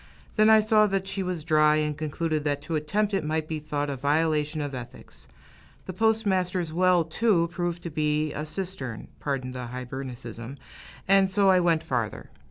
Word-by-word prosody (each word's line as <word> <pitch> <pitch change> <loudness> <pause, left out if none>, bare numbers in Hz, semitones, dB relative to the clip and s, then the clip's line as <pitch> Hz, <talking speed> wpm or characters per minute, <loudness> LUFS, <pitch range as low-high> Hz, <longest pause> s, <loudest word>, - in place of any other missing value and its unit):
Then 215 0 +5
I 220 0 +7
saw 215 0 +4
that 195 -1 -1
she 195 0 -3
was 180 -4 -3
dry, 155 -2 +4
and 150 -1 0
concluded 155 0 -2
that 145 -1 0
to 160 +1 -3
attempt 200 +8 0
it 195 -4 +1
might 155 0 -1
be 155 -1 -3
thought 145 -1 -3
a 140 - -3
violation 150 +2 0
of 145 -2 -3
ethics. 125 -2 -10 0.6
The 185 - -6
postmaster's 190 -5 +1
well, 180 0 +4
too, 170 0 +1
proved 175 -1 -3
to 170 - -5
be 150 0 0
a 150 +1 -4
cistern, 155 - -5
pardon 135 -3 -3
the 125 -1 -6
Hibernicism, 125 0 -7 0.5
and 195 0 +5
so 195 0 +4
I 185 - +5
went 165 -2 +2
farther. 125 -8 -3
155 Hz, 175 wpm, -26 LUFS, 145-185 Hz, 0.6 s, I